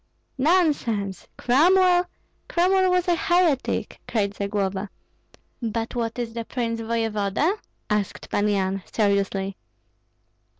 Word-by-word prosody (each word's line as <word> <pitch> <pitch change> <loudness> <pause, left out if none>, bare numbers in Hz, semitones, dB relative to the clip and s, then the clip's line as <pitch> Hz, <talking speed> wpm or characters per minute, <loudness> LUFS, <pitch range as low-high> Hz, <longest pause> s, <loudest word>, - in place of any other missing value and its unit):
"Nonsense! 260 - +1
Cromwell? 355 +7 +4 0.4
Cromwell 370 +2 +3
was 360 0 +2
a 350 - +4
heretic!" 345 -6 +1
cried 205 -3 0
Zagloba. 200 -1 -2 0.7
"But 230 0 -2
what 230 -1 -2
is 235 -2 -3
the 230 0 -3
prince 230 -1 -3
voevoda?" 225 - 0 0.3
asked 210 -2 -2
Pan 205 +1 +1
Yan, 195 -1 0
seriously. 200 -2 0
230 Hz, 100 wpm, -24 LUFS, -, 0.7 s, Cromwell